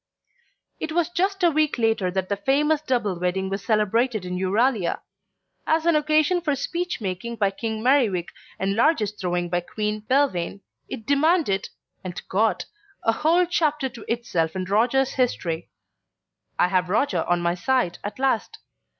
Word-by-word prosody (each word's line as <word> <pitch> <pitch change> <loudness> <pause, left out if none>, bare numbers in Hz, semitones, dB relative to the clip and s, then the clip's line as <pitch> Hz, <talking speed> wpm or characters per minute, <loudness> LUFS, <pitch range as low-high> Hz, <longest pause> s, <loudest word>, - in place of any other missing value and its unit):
It 315 - -4
was 345 0 +1
just 385 +2 0
a 345 - +5
week 305 -1 +1
later 225 -5 +1
that 190 0 -2
the 200 - 0
famous 290 +7 +1
double 235 - -1
wedding 185 +2 -1
was 195 +1 -3
celebrated 220 0 +1
in 180 0 -4
Euralia. 200 +2 +1 0.7
As 320 +1 +2
an 340 -2 +4
occasion 310 +3 +2
for 300 -4 0
speech 345 +5 -3
making 205 +3 -4
by 200 -3 +1
King 220 +2 -4
Merriwig 235 -10 +2 0.3
and 195 +1 -1
largesse 230 -4 +2
throwing 175 -3 -2
by 175 0 0
Queen 210 +4 -3
Belvane 230 -9 +1 0.3
it 220 - -6
demanded 285 - +2 0.3
and 180 -1 -5
(got) 195 -3 +1 0.4
a 225 - +3
whole 330 +9 +3
chapter 300 -5 0
to 235 -3 -11
itself 180 -9 -1
in 185 0 -2
Roger's 240 +7 +2
History. 175 -10 -1 0.9
I 180 - +3
have 180 -1 +1
Roger 195 - +1
on 175 0 +1
my 170 0 +1
side 210 -1 0
at 205 0 -5
last. 260 -4 0
225 Hz, 160 wpm, -24 LUFS, 190-285 Hz, 0.9 s, a